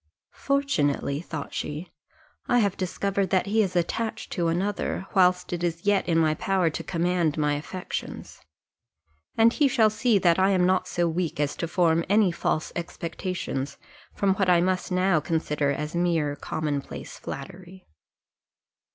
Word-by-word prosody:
"Fortunately," 150 - 0
thought 160 -4 -6
she, 160 +4 -5 0.6
"I 245 - +3
have 200 -5 +2
discovered 195 +1 -1
that 185 0 +2
he 215 +2 +2
is 190 -3 -1
attached 220 +6 -2
to 175 -4 0
another, 190 +2 -1
whilst 180 -1 +3
it 175 0 -3
is 170 0 -2
yet 205 -3 +2
in 165 - +3
my 160 -1 +3
power 185 0 +1
to - - -5
command 170 -3 0
my 150 -1 +1
affections; 170 +5 -6 1.0
and 230 +1 +5
he 290 - +3
shall 225 -5 +3
see 225 0 +2
that 175 -2 +3
I 190 +1 +4
am 185 -2 +3
not 185 0 +2
so 175 0 0
weak 165 -2 -2
as 145 -1 0
to 170 - -2
form 165 -1 +2
any 205 -2 +4
false 160 -2 -1
expectations 170 -5 -4 0.3
from 195 -1 +1
what 195 -2 +2
I 175 -1 +6
must 185 +1 0
now 185 -2 +3
consider 150 -3 -1
as 150 +2 -4
mere 165 -4 +1
common 150 -2 -2
place - - -9
flattery." 185 0 -9
180 Hz, 160 wpm, -26 LUFS, 160-195 Hz, 1.0 s, I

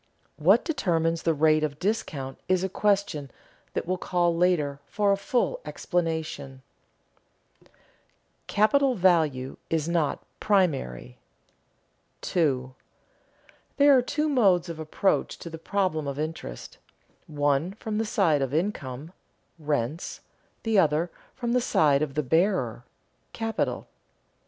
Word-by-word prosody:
What 190 - +4
determines 165 - 0
the 165 - +2
rate 155 +1 +3
of 145 -2 -2
discount 150 -9 -3
is 185 -1 +2
a 190 - -1
question 195 -8 0 0.5
that - - -1
will 185 +1 -2
call 175 -2 +1
later 165 -5 +1
for 205 -1 +1
a - - +4
fuller 245 - -1
explanation. 160 -6 -3 1.0
[Sidenote: - - -28 0.7
Capital 255 +6 +3
value 160 - +2
is 160 -1 0
not 170 -4 0 0.2
primary] 65 - 0 1.0
2. 130 -7 0 1.1
_There 285 0 +7
are 255 - +5
two 300 +5 -1
modes 195 - +3
of 165 -1 -6
approach 160 +5 0
to 170 - -9
the 165 - -7
problem 165 -4 -1
of 140 0 -4
interest: 155 - -6 0.5
one 145 +3 0
from 215 0 -4
the - - +1
side 170 -9 +2
of 135 +1 -1
income 155 -4 -3 0.5
(rents); 150 0 -2 0.4
the 225 -3 +3
other, 160 +1 +2 0.2
from 240 -2 -3
the 250 +1 +3
side 145 -10 +3
of 145 -3 -2
the 150 - 0
bearer 160 - +1 0.5
(capital). 225 -1 -2
165 Hz, 125 wpm, -26 LUFS, 145-200 Hz, 1.1 s, There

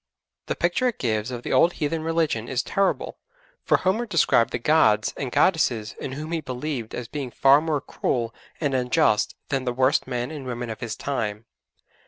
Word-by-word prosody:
The - - -1
picture 175 +10 +1
it 240 - -2
gives 110 -2 -1
of 120 -1 -6
the - - -2
old 170 +7 +5
heathen 160 +1 -2
religion 160 -8 0
is 130 0 -1
terrible, 195 0 -1 0.4
for - - +3
Homer 220 +6 0
described 165 - +3
the - - -2
'gods' 115 -6 +3
and 130 -3 -4
'goddesses' 120 - +2
in 130 - -5
whom 155 +4 -6
he 165 -1 -1
believed 130 -3 -4
as 120 - -5
being 140 0 -5
far 135 +4 +5
more 155 -3 -1
cruel 115 -3 -2 0.3
and 145 -4 0
unjust 125 -4 +2
than 135 -2 0
the 125 -1 -1
worst 130 +2 +2
men 125 +2 -3
and 145 -4 -7
women 120 -1 -4
of 110 - -7
his 120 - -4
time. 115 -6 -3
130 Hz, 190 wpm, -24 LUFS, 120-155 Hz, 0.4 s, old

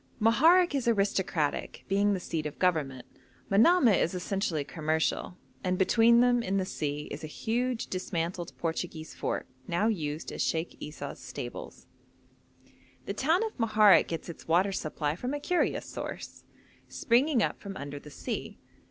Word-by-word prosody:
Moharek 320 +11 +5
is 270 -4 -1
aristocratic, 195 -8 0
being 200 +1 +2
the - - -3
seat 160 -3 -3
of 150 - -9
government; 145 -9 0 0.5
Manamah 230 - +5
is 170 - 0
essentially 180 -4 -1
commercial, 155 +4 -1 0.3
and 185 0 0
between 230 +5 +5
them 245 -1 +4
in 195 -3 -1
the 190 - 0
sea 150 -4 -3
is - - -6
a - - -4
huge 240 +8 -2
dismantled 175 -1 -3
Portuguese 165 -1 -4
fort, - - -3 0.2
now 175 +5 +1
used 160 -8 -2
as - - -4
Sheikh 165 +1 -1
Esau's 145 -2 -7
stables. 125 -4 -8 1.2
The - - -3
town 320 - +2
of 445 - -4
Moharek 215 -3 +5
gets 165 - -5
its 170 - -10
water 180 +5 +3
supply 155 -4 -2
from 250 +10 -3
a - - -3
curious 355 +4 0
source, - - -7 0.4
springing 250 0 +2
up - - -2
from 200 -1 -7
under 145 0 -6
the 150 - -12
sea. - - -5
185 Hz, 150 wpm, -29 LUFS, 160-230 Hz, 1.2 s, Moharek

